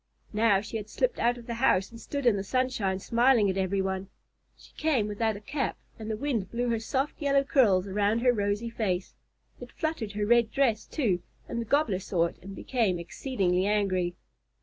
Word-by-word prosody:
Now 210 -2 +3
she 225 +2 -5
had 215 0 -7
slipped - - 0
out 240 +1 +2
of 235 - -11
the 235 - -4
house 230 -5 +2
and 230 0 -11
stood 280 -2 -4
in 235 -4 +5
the 195 - -2
sunshine 220 -4 0
smiling 235 0 +3
at 190 - -5
every 190 0 0
one. 190 0 -3 0.5
She - - -19
came 280 -9 +1
without 215 +1 -1
a - - -7
cap, 270 +7 -3 0.2
and 220 0 -6
the 215 - -2
wind 230 -7 -2
blew 240 +1 -1
her 230 -1 +1
soft 265 +7 -2
yellow 280 -1 +3
curls 210 -10 +3
around 205 +3 +1
her 250 0 +4
rosy 205 +2 -1
face. 190 -5 -2 0.5
It - - -10
fluttered 315 - -3
her 205 0 -1
red 235 0 +4
dress, 230 -4 +1
too, 205 - 0 0.3
and 235 - -3
the - - -4
Gobbler 230 -6 +2
saw 175 -3 +1
it 170 - -6
and 195 +1 -9
became 220 -8 0
exceedingly 185 0 -1
angry. 185 -4 +1
220 Hz, 200 wpm, -28 LUFS, 195-245 Hz, 0.5 s, in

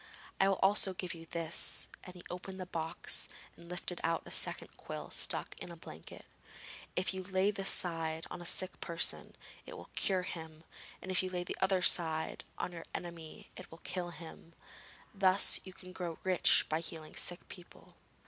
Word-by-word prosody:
I 195 - +5
will 195 - +2
also 195 -1 +3
give 180 -1 -3
you 165 -1 -10
this,' 165 0 +1 0.2
and 180 - -10
he 180 - -11
opened 185 +1 -7
a 185 - -4
box 165 -2 +1 0.3
and 170 0 -14
lifted 180 0 -4
out 165 0 +1
a - - -10
second - - +1
quill - - -7
stuck - - +2
in - - -7
a - - -8
blanket. 80 - -11 0.7
'If 185 +1 0
you 190 0 -4
lay 190 +2 +2
this 195 -1 +1
side 165 -2 +2
on 180 - -6
a - - -8
sick 185 +1 +2
person, 170 -1 0 0.3
it - - -7
will - - -11
cure 185 -2 +1
him; 160 -3 -7 0.4
and 185 - -4
if 185 - +4
you 185 - -2
lay 180 -1 -2
the - - -4
other 190 -1 +3
side 160 -2 +4
on - - -2
your 165 -1 -8
enemy, 170 -2 -7
it - - -10
will 165 - -13
kill 180 -1 -3
him. 165 -1 -11 0.6
Thus 195 -1 +5
you 190 - -8
can 185 0 -12
grow 175 -3 -4
rich 185 -2 +5
by 155 - 0
healing 160 -1 -6
sick 175 +1 0
people.' 180 -3 -13
180 Hz, 185 wpm, -34 LUFS, 165-185 Hz, 0.7 s, I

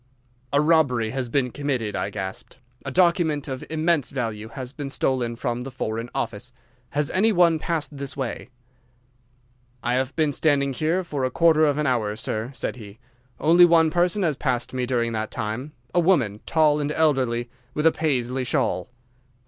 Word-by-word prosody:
"'A 140 - +3
robbery 140 -8 +3
has 130 -1 -3
been 125 0 0
committed,' 130 -7 -2
I - - -1
gasped. 95 0 -6 0.3
'A - - -2
document 165 -2 +2
of 130 -2 -5
immense 160 -2 +1
value 110 -5 -4
has 130 +2 -7
been 145 -2 -5
stolen 125 -3 -1
from 120 +1 -3
the 130 - -6
Foreign 115 -2 -4
Office. 115 +2 -3 0.4
Has 145 +2 -1
any 215 +4 +3
one 170 -4 +4
passed 160 -2 -2
this 140 -1 -6
way?' 130 -1 -4 1.3
"'I 120 - 0
have 130 +1 -1
been 155 -2 +2
standing 140 -2 +1
here 160 +7 0
for 145 -6 -3
a 130 - +1
quarter 160 +2 +4
of 145 -1 +1
an 150 - 0
hour, 115 -6 0
sir,' 110 +1 -3
said 125 -1 -4
he; 105 -2 -11 0.4
'only 170 +3 +6
one 165 -2 +4
person 175 +4 +1
has 155 -6 +1
passed 125 -4 -1
during 125 -2 -1
that 110 -1 -2
time—a 125 +5 -4
woman, 140 - +2
tall 155 -2 +3
and 145 0 -1
elderly, 130 -7 +1 0.2
with 150 - -1
a 165 - +7
Paisley 130 -5 -1
shawl. 90 -6 -1
135 Hz, 170 wpm, -24 LUFS, 120-155 Hz, 1.3 s, a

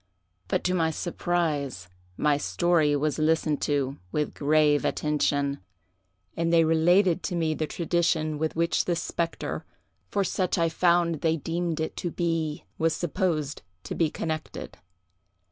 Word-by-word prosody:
But, - - 0
to 180 - +1
my 165 -3 +2
surprise, 155 - -2 0.3
my 150 -1 +3
story 155 0 +2
was 150 +2 0
listened 155 -1 +1
to 140 -2 0
with 150 -1 -1
grave 150 0 +3
attention, 145 -2 0 0.8
and 165 0 0
they 165 -1 +5
related 175 +3 +4
to 180 - -3
me 160 -2 +1
the 155 0 -2
tradition 165 -3 0
with 160 0 -1
which 170 +1 +1
this 170 -2 0
spectre, 170 -1 -3 0.5
for 200 - +1
such 185 0 0
I 165 -1 +2
found 170 -1 +2
they 165 0 +2
deemed 165 +1 -2
it 160 - -2
to 175 - -2
be, 165 -3 -2
was 160 -1 +2
supposed 155 -4 -1 0.2
to - - -5
be 165 -2 +1
connected. 155 0 -5
160 Hz, 145 wpm, -27 LUFS, 150-170 Hz, 0.8 s, they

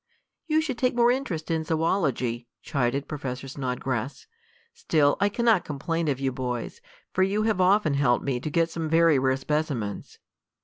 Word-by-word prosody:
"You 310 0 +3
should 265 -7 -4
take 250 -1 +1
more 240 0 +4
interest 190 - -3
in 160 -1 0
zoology," 150 -8 0 0.2
chided 135 -1 -1
Professor 135 -3 -5
Snodgrass. 130 -1 -3 0.5
"Still 145 -3 +2
I 205 - +3
cannot 225 -2 +2
complain 165 +3 -2
of 135 -3 0
you 135 -1 0
boys, 125 - -4 0.3
for - - +1
you 200 +3 +2
have 215 -4 +1
often 185 -4 +3
helped 140 -3 +2
me 130 -3 -1
to 155 - -4
get 165 +2 +1
some 165 -2 -3
very 165 -3 +4
rare 130 0 +1
specimens." 135 -7 -3
155 Hz, 165 wpm, -26 LUFS, 130-185 Hz, 0.5 s, more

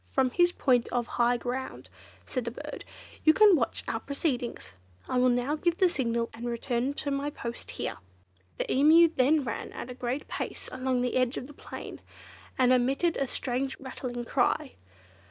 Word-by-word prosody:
"From 260 -2 +2
his 350 +5 +4
point 250 -8 +2
of 245 -1 -1
high 240 +1 +2
ground," 255 +2 -5 0.4
said 255 -3 -3
the - - -1
bird, 235 - -8 0.4
"you 315 0 +6
can 420 -3 +7
watch 240 -7 -1
our 225 - -1
proceedings. 275 -3 -3 0.4
I 255 - +1
will 250 0 +5
now 245 +4 +1
give 340 +2 0
the 370 - +4
signal 235 -6 -1
and 235 +2 -6
return 240 +3 -1
to 285 - -3
my 280 +1 -1
post 235 -5 -6
here." - - -4 0.6
The - - -2
Emu 320 +5 +7
then 285 +4 +3
ran 235 - -4
at 250 - -6
a - - -5
great 255 +3 -3
pace - - -5
along 255 -1 0
the 250 - 0
edge 255 -1 +1
of - - -4
the 295 - -12
plain, - - -9 0.6
and 255 -1 +5
emitted 270 +7 +2
a 275 - 0
strange 260 +2 -3
rattling 250 -2 -5
cry. 270 +3 +1
255 Hz, 180 wpm, -29 LUFS, 245-285 Hz, 0.6 s, can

